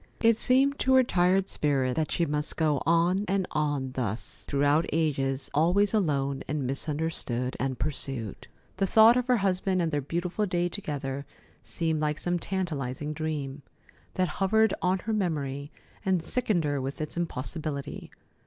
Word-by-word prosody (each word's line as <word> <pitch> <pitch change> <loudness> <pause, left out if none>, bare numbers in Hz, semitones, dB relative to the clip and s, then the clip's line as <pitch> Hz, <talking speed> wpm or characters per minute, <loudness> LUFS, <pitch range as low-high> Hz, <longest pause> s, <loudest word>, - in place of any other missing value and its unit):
It 230 0 +5
seemed 270 +5 +2
to 260 0 +3
her 260 - +7
tired 185 -2 +2
spirit 135 -4 0
that 155 -1 -1
she 170 - +1
must 150 0 -2
go 150 -4 +2
on 170 +4 +3
and 195 0 +1
on 145 -4 -1
thus, 120 -4 -3
throughout 145 +3 +2
ages, 140 -4 0
always 180 +7 +3
alone 140 -9 +1
and 145 -1 -2
misunderstood 135 -3 -2
and 130 -1 -1
pursued. 135 -6 -2 0.3
The 195 0 +1
thought 220 +4 +7
of 250 0 0
her 250 -1 +4
husband 190 -1 +1
and 165 -2 0
their 145 -1 0
beautiful 175 +8 -2
day 175 -1 0
together 140 -7 -4 0.3
seemed 160 -2 -2
like 150 0 0
some 175 +1 -1
tantalizing 150 -7 -3
dream, 150 -3 -4 0.5
that 185 0 +2
hovered 220 +3 +4
on 185 +1 +2
her 220 +4 -3
memory 145 -7 -2 0.3
and 185 -5 +1
sickened 210 -2 0
her 145 -2 -1
with 135 +2 -4
its 155 -1 -4
impossibility. 155 -2 -4
160 Hz, 155 wpm, -28 LUFS, 140-185 Hz, 0.5 s, her